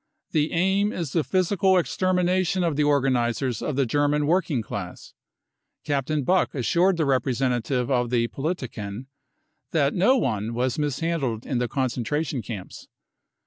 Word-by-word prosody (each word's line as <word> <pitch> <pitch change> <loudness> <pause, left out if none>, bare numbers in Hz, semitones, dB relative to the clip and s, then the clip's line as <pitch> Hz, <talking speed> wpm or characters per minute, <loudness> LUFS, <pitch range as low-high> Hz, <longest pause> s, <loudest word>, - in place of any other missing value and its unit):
The 155 -1 +1
aim 190 +4 +2
is 165 -9 -4
the 165 - +2
physical 190 +1 +2
extermination 185 +1 +1
of 165 -4 0
the 150 - +2
organisers 130 -4 +1
of 150 - -2
the 135 0 +2
German 145 +3 +1
working 160 -6 +1
class. 90 -4 -7 0.7
Captain 145 0 -1
Buck 185 +4 +1
assured 170 +8 +2
the 160 - +1
representative 130 -1 0
of 125 -2 +1
the 115 -1 +1
Politiken 125 - -4 0.6
that 145 -3 +1
no 240 +9 +4
one 110 - -1
was 125 +3 -1
mishandled 145 -5 -1
in 130 -4 -1
the 125 - 0
concentration 130 +2 -2
camps. 105 -5 -8
145 Hz, 140 wpm, -25 LUFS, 125-170 Hz, 0.7 s, no